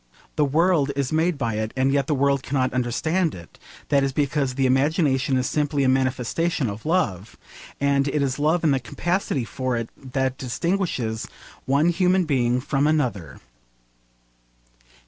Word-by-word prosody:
The 150 - +3
world 155 0 +2
is 140 -2 -1
made 160 +1 +1
by 115 -5 -2
it, 110 0 -3
and 135 +1 +2
yet 140 -1 +1
the 150 - +1
world 140 0 +2
cannot 130 -2 -1
understand 155 +8 0
it: 85 -2 -13 0.3
that 140 -2 +3
is 135 - 0
because 140 -1 -1
the 135 0 +1
imagination 135 -1 +2
is 130 0 0
simply 145 -1 0
a - - +3
manifestation 130 +2 0
of 105 +7 -8
love, 105 - -1 0.4
and 140 0 +2
it 140 0 0
is 135 0 -2
love 160 +4 +1
and 155 -3 +3
the 135 - +1
capacity 170 0 -2
for 130 0 -2
it 115 -1 -4
that 130 -1 -3
distinguishes 130 - -2 0.4
one 140 +5 +3
human 180 +1 +2
being 125 -4 +1
from 140 +1 0
another. 120 - -1
140 Hz, 160 wpm, -23 LUFS, 130-155 Hz, 0.4 s, The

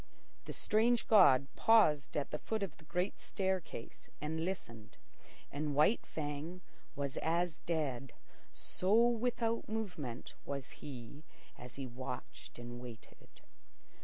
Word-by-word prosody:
The - - -5
strange 230 +2 +3
god 145 - +7
paused 155 -13 +5
at 140 -2 -1
the 150 - -2
foot 220 -2 -2
of 195 - -5
the 155 - -17
great 180 +4 -1
staircase 190 - -3
and 160 +2 -2
listened, 115 - -5 0.5
and 145 0 -2
White 155 +11 +4
Fang 155 +4 -4 0.3
was 140 -1 -2
as 170 0 +1
dead, 140 -6 -1 0.4
so 190 +3 0
without 235 -1 0
movement 180 - -4
was 140 -1 -4
he 140 +1 -8 0.3
as 125 0 -10
he 135 - -4
watched 125 0 -7
and 120 0 -7
waited. 120 -2 -12
155 Hz, 125 wpm, -35 LUFS, 135-190 Hz, 0.5 s, god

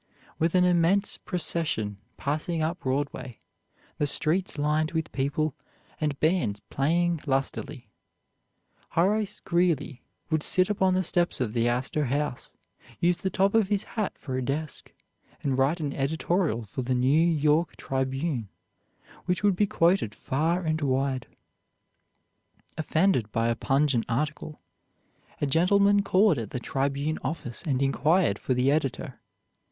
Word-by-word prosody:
With 165 +2 +1
an 180 - +5
immense 180 +3 +2
procession 160 - -2 0.2
passing 155 +4 -2
up 165 +3 -2
Broadway, 130 -4 -3 0.6
the 145 - +2
streets 160 +5 0
lined 155 +2 0
with 160 0 -2
people, 140 +2 -1 0.5
and 150 -3 -1
bands 155 - +1
playing 170 +4 +1
lustily, 135 0 -2 1.1
Horace 205 +3 +1
Greeley 170 -7 0 0.3
would 155 -1 +2
sit 185 +5 +2
upon 190 -2 +2
the 185 - +1
steps 175 0 +1
of 115 -4 -1
the 120 0 +1
Astor 130 +5 0
House, 140 0 -2 0.5
use 175 0 +2
the 190 - -2
top 195 +1 +2
of 225 -3 +3
his 205 0 +1
hat 215 -4 -2
for 130 -3 -5
a 130 - -1
desk, 145 +4 -4 0.5
and 135 -2 +1
write 135 +6 +2
an 145 -3 -2
editorial 155 - 0
for 110 +5 -5
the 130 +1 -1
"New 130 +6 +3
York 155 +1 +2
Tribune" 135 - -2 0.8
which 180 +1 -1
would 200 -2 +4
be 205 +3 +2
quoted 170 - +2
far 160 +6 0
and 160 -1 -1
wide. 135 -2 0 1.5
Offended 155 - +1
by 115 +2 +1
a 115 - +1
pungent 135 -2 +1
article, 150 +4 -3 0.8
a - - +1
gentleman 200 +7 +4
called 195 - +3
at 110 -3 -5
the 125 - -4
"Tribune" 140 +4 -1
office 125 -7 -4
and 135 -3 0
inquired 150 - +2
for 130 - -1
the 125 +2 +3
editor. 145 -4 -2
155 Hz, 140 wpm, -27 LUFS, 135-175 Hz, 1.5 s, an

